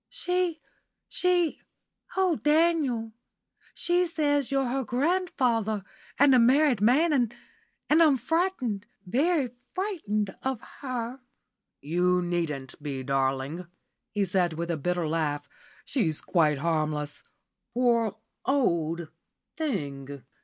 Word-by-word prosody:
"She 360 -2 -1 0.5
she 355 -3 +1 0.6
oh, 370 -3 +3
Daniel, 295 -7 +2 0.6
she 350 +1 +2
says 290 -4 +1
you're 270 -1 +2
her 265 +2 -1
grandfather, 245 - 0 0.3
and 280 0 +6
a 255 - +6
married 260 -1 +4
man, 290 +9 +4
and 245 -5 +2 0.6
and 310 +3 +5
I'm 300 -5 +6
frightened 255 - -1 0.2
very 280 - +2 0.3
frightened 215 - -2
of 265 -3 -2 0.2
her." 255 -2 -4 0.6
"You 180 +4 +1
needn't 155 -7 -3
be, 140 -3 -4
darling," 135 +5 -1 0.4
he 205 -2 0
said, 180 -2 +1
with 170 +2 -3
a - - 0
bitter 175 +2 -1
laugh; 155 -2 -1 0.4
"she's 170 - 0
quite 155 -5 +2
harmless, 150 -1 -1 0.5
poor 235 -4 +2 0.3
old 170 - +1 0.5
thing. 145 - -4
230 Hz, 110 wpm, -27 LUFS, -, 0.6 s, and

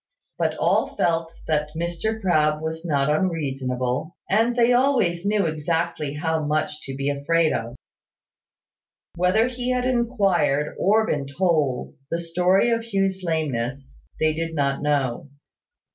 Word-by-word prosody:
But - - +1
all - - +1
felt 165 -1 0
that 150 -1 -1
Mr 175 +7 -2
Crabbe 155 -6 +2
was 160 +1 -4
not 140 -5 +1
unreasonable, 140 -4 -1
and 225 +4 +2
they 240 0 +4
always 230 -9 +2
knew 205 -2 +2
exactly 160 -1 -2
how 160 +1 -1
much 150 0 -1
to 135 - -5
be 140 +1 -3
afraid 155 +3 +1
of. 115 +2 -4 1.4
Whether 180 +6 +3
he 250 0 -4
had 250 0 0
inquired, 200 - +1
or 220 +3 +3
been 145 -8 -2
told, 150 -5 0 0.2
the 165 - -1
story 180 +6 +2
of 230 0 +1
Hugh's 195 -4 -1
lameness, 135 -5 -3 0.2
they 155 0 +2
did 165 +1 -3
not 140 -2 0
know. 140 -2 -1
165 Hz, 135 wpm, -23 LUFS, 150-195 Hz, 1.4 s, they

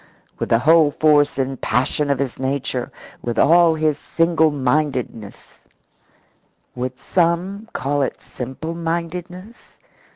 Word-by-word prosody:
With - - -3
the 115 - +4
whole 155 +4 +5
force 145 -1 +3
and 135 -1 -2
passion 130 +5 0
of 140 - +2
his 135 -2 -3
nature, 130 -1 -2 0.3
with 120 -1 -4
all 170 0 +5
his 155 -2 0
single 165 -1 +2
mindedness 130 -6 -2 1.2
would 125 +1 -4
some 180 - -1
call 145 +1 -1
it 135 - -2
simple 130 +6 -6
mindedness? 175 +5 -6
150 Hz, 120 wpm, -20 LUFS, 130-170 Hz, 1.2 s, whole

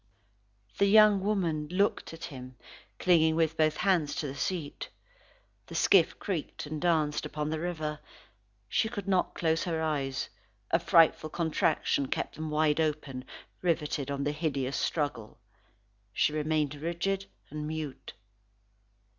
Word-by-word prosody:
The 200 - +5
young 210 -1 +7
woman 175 -7 0
looked 200 +4 0
at 165 - -10
him, 130 -2 -8 0.4
clinging 160 -3 +4
with 160 -1 +1
both 155 -1 +2
hands 175 -7 +2
to - - -2
the 135 - -4
seat. 150 +1 -3 0.8
The - - -9
skiff 185 -5 +4
creaked 175 -7 -4
and 150 0 -5
danced 155 -4 +1
upon 150 0 -3
the 160 - -2
river. 155 -3 -3 0.7
She 220 - +1
could 205 -4 -6
not 185 -2 +1
close 160 -1 +1
her 165 -3 -1
eyes, 140 -5 -1 0.4
a 165 - +4
frightful 165 -2 +4
contraction 155 -4 +1
kept - - -2
them 155 0 -5
wide 150 0 +2
open 150 -4 -2 0.4
riveted 150 -5 0
on 140 0 -2
the 145 - 0
hideous 140 -4 -2
struggle. 145 -9 -2 0.8
She 150 - +2
remained 155 -1 0
rigid 170 +6 -2 0.2
and 150 0 -4
mute. 155 -3 -5
155 Hz, 140 wpm, -30 LUFS, 150-170 Hz, 0.8 s, young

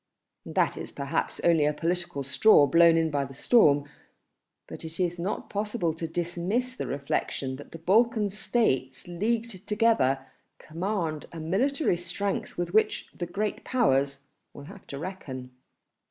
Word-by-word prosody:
That - - +1
is - - -6
perhaps 140 -1 -2
only 165 -3 +4
a 150 +1 +2
political 170 -3 -2
straw 145 +4 +5
blown 165 +1 +5
by 140 -1 0
the 135 0 -8
storm, 145 - +4 0.8
but - - -9
it 160 +2 -8
is 175 -1 0
not 185 +4 -3
possible 210 -5 -1
to 165 +1 -4
dismiss 175 +9 -2
the - - -4
reflection 140 -1 -2
that 145 - -12
the - - -8
Balkan 215 +5 +2
States 180 - 0
leagued 215 +2 -2
together 205 - +2 0.3
command 165 -2 -3
a 165 - -8
military 215 - +1
strength 180 +3 -3
with 175 0 -3
which 220 - +2
the 175 - -4
Great 205 +4 -3
Powers 140 - +1 0.3
will 140 - -9
have 190 +6 -13
to 140 - -6
reckon 140 -7 -7
170 Hz, 145 wpm, -27 LUFS, 145-210 Hz, 0.8 s, straw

